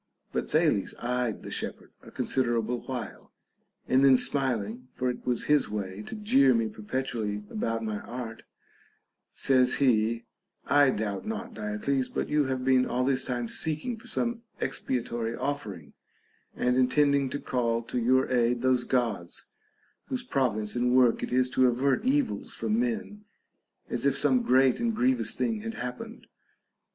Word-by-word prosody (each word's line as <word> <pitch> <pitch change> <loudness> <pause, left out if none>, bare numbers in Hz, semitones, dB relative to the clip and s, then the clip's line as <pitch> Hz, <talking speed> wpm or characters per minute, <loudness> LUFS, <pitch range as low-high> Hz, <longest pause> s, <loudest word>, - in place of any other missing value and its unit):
But - - -2
Thales 155 - +1
eyed 125 -2 -2
the - - -7
shepherd - - -5
a - - -13
considerable 120 -2 0
while, 130 -2 -6 0.6
and 130 +1 +4
then 135 -2 +7
smiling 125 -3 -1
(for 125 0 -1
it 125 - -9
was 125 -2 0
his 150 -1 +2
way 100 -1 -4
to - - -5
jeer 140 - +4
me 115 -1 +1
perpetually 105 -1 -3
about 115 +1 -2
my 110 -2 -3
art) 120 -1 -7 0.9
says 130 -2 +3
he, 115 -3 +2 0.4
I 145 -1 +5
doubt 105 - -2
not, 220 0 -5
Diodes, 110 +5 -1
but - - -2
you 150 -1 +2
have 130 -1 -2
been 130 -1 +4
all 125 +1 0
this 135 -1 +1
time 120 -2 -2
seeking 155 - -1
for 225 - -15
some 235 -1 -1 0.2
expiatory 120 -2 -2
offering, 105 - -4 0.6
and 125 0 +1
intending 140 +1 +3
to 140 - -4
call 115 -2 -1
to 125 - -3
your 130 +3 +3
aid 120 0 +2
those 130 -1 +3
Gods 115 -9 -1 0.6
whose 255 -2 -3
province 120 - 0
and 125 +1 +2
work 125 -3 +4
it - - -4
is 130 0 +3
to 130 -1 +4
avert 130 - +1
evils 275 +1 0
from 220 +1 0
men, 220 -3 -3 0.6
as - - 0
if - - +2
some 255 -1 +3
great 130 - +3
and 230 -1 0
grievous 255 +2 +1
thing 225 -2 -1
had 225 +1 -5
happened. 125 0 -7
125 Hz, 155 wpm, -28 LUFS, 115-140 Hz, 0.9 s, then